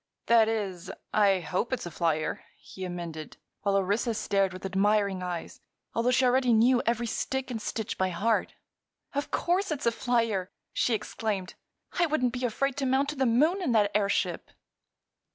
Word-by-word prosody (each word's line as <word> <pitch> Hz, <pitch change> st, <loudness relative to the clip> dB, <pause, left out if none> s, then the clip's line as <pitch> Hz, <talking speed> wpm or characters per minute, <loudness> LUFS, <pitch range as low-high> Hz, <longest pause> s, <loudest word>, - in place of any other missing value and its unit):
"That 230 Hz, -1 st, +5 dB
is, 200 Hz, -6 st, -3 dB, 0.2 s
I 200 Hz, -3 st, +4 dB
hope 185 Hz, -, -2 dB
it's 260 Hz, -, -2 dB
a 175 Hz, -, -6 dB
flyer," 160 Hz, -1 st, -1 dB, 0.2 s
he 190 Hz, -, -8 dB
amended, 170 Hz, -3 st, -6 dB, 0.2 s
while 200 Hz, -1 st, +2 dB
Orissa 205 Hz, +4 st, 0 dB
stared 195 Hz, -2 st, +1 dB
with 185 Hz, +1 st, -8 dB
admiring 200 Hz, 0 st, +1 dB
eyes, 175 Hz, -2 st, -5 dB, 0.3 s
although 230 Hz, +2 st, +1 dB
she 255 Hz, +1 st, +3 dB
already 250 Hz, -1 st, +3 dB
knew 240 Hz, +3 st, +5 dB
every 235 Hz, 0 st, +1 dB
stick 265 Hz, +3 st, -2 dB
and 225 Hz, -3 st, -4 dB
stitch 220 Hz, 0 st, -4 dB
by 190 Hz, 0 st, +2 dB
heart. 205 Hz, +6 st, 0 dB, 0.6 s
"Of 285 Hz, +1 st, -2 dB
course 370 Hz, +3 st, 0 dB
it's 295 Hz, -4 st, -3 dB
a 235 Hz, -, +4 dB
flyer!" 230 Hz, -6 st, 0 dB, 0.2 s
she 235 Hz, -, +2 dB
exclaimed. 205 Hz, -3 st, -3 dB, 0.5 s
"I 345 Hz, -, +4 dB
wouldn't 255 Hz, -6 st, +1 dB
be 255 Hz, 0 st, -4 dB
afraid 275 Hz, +4 st, -1 dB
to 275 Hz, -2 st, 0 dB
mount 270 Hz, +2 st, +2 dB
to 300 Hz, -, -4 dB
the 265 Hz, -2 st, +1 dB
moon 305 Hz, +12 st, +3 dB
in 295 Hz, -9 st, 0 dB
that 205 Hz, -2 st, +3 dB
airship." 200 Hz, -1 st, 0 dB
225 Hz, 170 wpm, -28 LUFS, 190-255 Hz, 0.6 s, That